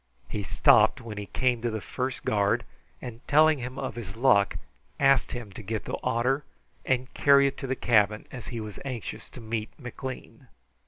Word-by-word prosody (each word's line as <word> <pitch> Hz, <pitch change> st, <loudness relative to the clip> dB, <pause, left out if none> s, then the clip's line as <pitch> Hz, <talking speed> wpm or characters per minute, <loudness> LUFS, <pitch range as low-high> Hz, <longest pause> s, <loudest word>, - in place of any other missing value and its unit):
He 105 Hz, -, -4 dB
stopped 95 Hz, -, +4 dB
when 110 Hz, -4 st, -7 dB
he 100 Hz, -, -6 dB
came 125 Hz, -2 st, 0 dB
to 120 Hz, -, 0 dB
the 110 Hz, -1 st, -3 dB
first 130 Hz, +5 st, -4 dB
guard, 100 Hz, -1 st, +1 dB, 0.4 s
and 120 Hz, -1 st, -7 dB
telling 155 Hz, 0 st, +5 dB
him 125 Hz, +1 st, -6 dB
of -, -, -3 dB
his 105 Hz, -5 st, -7 dB
luck, 100 Hz, -5 st, +3 dB, 0.4 s
asked 135 Hz, -2 st, +4 dB
him 120 Hz, -5 st, -6 dB
to 95 Hz, -, -9 dB
get 110 Hz, +1 st, -4 dB
the -, -, -3 dB
otter 125 Hz, +4 st, +1 dB, 0.4 s
and 130 Hz, 0 st, -1 dB
carry 140 Hz, -1 st, +5 dB
it 140 Hz, -, 0 dB
to 135 Hz, -, -4 dB
the 130 Hz, -, -1 dB
cabin, 110 Hz, -4 st, +2 dB
as 125 Hz, -3 st, -8 dB
he 120 Hz, -, -5 dB
was 105 Hz, -2 st, -7 dB
anxious 130 Hz, -5 st, -6 dB
to -, -, -11 dB
meet 110 Hz, -1 st, -3 dB
McLean. 130 Hz, 0 st, -8 dB
120 Hz, 190 wpm, -27 LUFS, 110-130 Hz, 0.4 s, telling